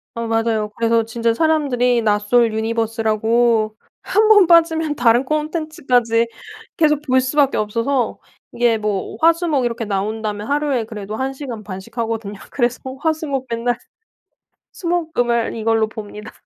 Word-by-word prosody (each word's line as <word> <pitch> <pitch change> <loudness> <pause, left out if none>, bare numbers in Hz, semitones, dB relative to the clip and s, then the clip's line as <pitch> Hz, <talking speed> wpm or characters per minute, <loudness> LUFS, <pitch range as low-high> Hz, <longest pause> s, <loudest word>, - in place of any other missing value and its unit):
어 230 0 -3
맞아요. 225 -1 0
그래서 230 0 +2
진짜 230 +1 0
사람들이 250 -5 +2
나솔 215 +2 +2
유니버스라고 225 0 +1 0.3
1 430 +1 +2
번 415 -4 +7
빠지면 325 -2 +3
다른 240 +1 +3
콘텐츠까지 300 -6 0 0.5
계속 300 -2 +3
볼 260 -3 +2
수밖에 275 +2 +1
없어서 230 +4 -1 0.3
이게 235 -2 +2
뭐 210 -2 -3
화, 330 +1 +6
수, 345 +1 -4
목 280 -5 +1
이렇게 230 -1 -3
나온다면 210 +1 -3
하루에 285 -4 0
그래도 215 -1 -7
1 265 +3 -2
시간 255 -6 -7
반씩 190 +3 -9
하거든요. 225 -3 -3 0.2
그래서 245 -2 -1 0.2
화, 320 -1 +2
수, 315 0 -6
목 270 -2 -3
맨날 235 +1 -1 1.0
수, 345 - -7
목, 335 -2 -1
금을 235 -1 0
이걸로 225 -1 +1
봅니다. 210 0 -9
235 Hz, 315 characters per minute, -19 LUFS, 220-285 Hz, 1.0 s, 번